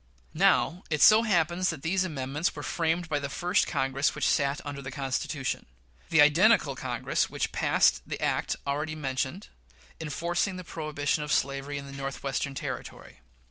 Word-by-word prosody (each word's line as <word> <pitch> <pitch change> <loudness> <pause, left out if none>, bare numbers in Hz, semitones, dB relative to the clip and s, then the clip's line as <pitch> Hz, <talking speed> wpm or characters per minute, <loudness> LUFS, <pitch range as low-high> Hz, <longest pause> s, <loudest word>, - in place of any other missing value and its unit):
Now, 180 0 +3
it 150 -2 0
so 215 +1 +8
happens 180 -4 +1
that 155 -4 -5
these 185 +3 +1
amendments 150 -2 -2
were - - -6
framed 165 +1 -1
by 150 -3 0
the 140 -1 -4
first 180 +6 +1
Congress 135 +2 0
which - - 0
sat 140 0 +1
under 145 -1 -5
the 130 - -6
Constitution 135 0 -3 0.4
the 165 -2 +5
identical 150 0 +5
Congress 125 -2 -1
which - - -2
passed - - +3
the - - -4
act - - 0
already 150 +3 -2
mentioned, 140 +5 -3 0.5
enforcing 170 +5 -1
the 185 - -7
prohibition 155 -3 -2
of 150 - -4
slavery 140 +1 0
in 140 - -6
the 140 - -10
Northwestern 140 0 -3
Territory. - - -7
150 Hz, 160 wpm, -28 LUFS, 140-170 Hz, 0.5 s, so